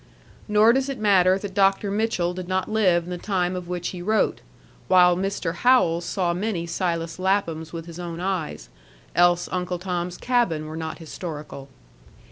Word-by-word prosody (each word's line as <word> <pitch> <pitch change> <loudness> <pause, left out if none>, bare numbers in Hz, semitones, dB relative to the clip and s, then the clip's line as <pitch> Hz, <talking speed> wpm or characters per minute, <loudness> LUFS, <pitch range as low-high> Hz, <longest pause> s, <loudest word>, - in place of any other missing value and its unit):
Nor 210 +2 +5
does 265 +1 0
it 275 - -3
matter 190 -3 +4
that 195 -1 -7
Dr. 195 0 +2
Mitchell 200 -5 0
did 180 0 -6
not 185 0 -1
live 190 -6 +2
in 175 - -8
the 180 - -4
time 185 -3 -1
of 180 -1 -6
which 175 -1 -3
he 180 - -7
wrote, 215 +4 +1 0.5
while 180 -1 +6
Mr. 190 -2 -2
Howells 175 -6 +3
saw 180 -3 0
many 185 -2 -2
Silas 170 -1 -2
Laphams 170 -5 0
with 165 -1 -6
his 170 0 -10
own 170 -1 -5
eyes; 185 -4 -3 0.5
else 175 0 +4
UNCLE 180 -1 -2
TOM'S 180 -1 -3
CABIN 235 -12 0
were 155 +1 -7
not 160 0 -5
historical. 155 -4 -8
180 Hz, 170 wpm, -24 LUFS, 170-195 Hz, 0.5 s, while